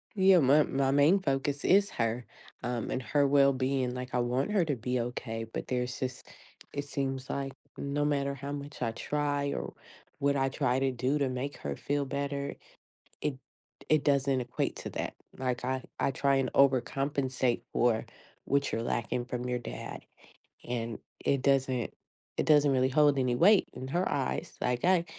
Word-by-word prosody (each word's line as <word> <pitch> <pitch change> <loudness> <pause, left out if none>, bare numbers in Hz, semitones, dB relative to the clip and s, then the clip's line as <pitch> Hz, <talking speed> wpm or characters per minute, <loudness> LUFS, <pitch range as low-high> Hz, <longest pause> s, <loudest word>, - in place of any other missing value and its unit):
Yeah, 190 -2 +6
my 145 +2 +5
my 135 -1 0
main 145 +8 +5
focus 140 -2 -1
is 200 +1 +5
her, 115 +1 -1 0.4
um, 120 -2 -2
and 130 - -1
her 140 +3 +2
well-being, 135 -2 +3
like, 125 0 -6
I 125 - +2
want 125 +9 0
her 195 -5 +3
to 145 -3 0
be 125 +1 -1
okay, 115 -1 -4
but - - -4
there's 125 -1 -2
this 130 -1 -4 0.5
it 145 0 -3
seems 135 -2 -3
like, 135 -1 -3 0.2
no 145 +1 -1
matter 140 -1 0
how 140 +1 -6
much 145 -1 -7
I 115 -2 0
try, 145 +3 -1
or - - -4 0.5
what 140 0 +2
I 135 -1 +2
try 130 -2 +1
to 135 0 +1
do 130 +4 0
to 140 - +1
make 130 +3 -4
her 70 -1 -4
feel 145 - -1
better, 140 +1 -3 0.7
it 150 -2 -1 0.5
it 155 -2 +3
doesn't 140 -2 +2
equate 120 - -2
to - - -6
that, - - -4 0.2
like, 125 -2 -2
"I 130 0 -1 0.2
I - - +2
try 140 +1 +2
and 135 -2 0
overcompensate 135 -1 +2
for 115 -2 +2 0.4
what 140 0 +1
you're 115 - -1
lacking 120 +1 -1
from 125 0 -4
your 125 0 0
dad." - - -7 0.7
And, 115 -2 -3 0.3
it 140 -2 +2
doesn't 135 -3 +1 0.5
it - - +1
doesn't 145 -2 +5
really 130 0 +3
hold 145 0 +4
any 125 -2 +2
weight 200 - +5
in 130 - -6
her 175 +7 0
eyes. 135 -2 -2
Like, 125 -1 0
I 180 -2 +4
135 Hz, 175 wpm, -30 LUFS, 125-140 Hz, 0.7 s, Yeah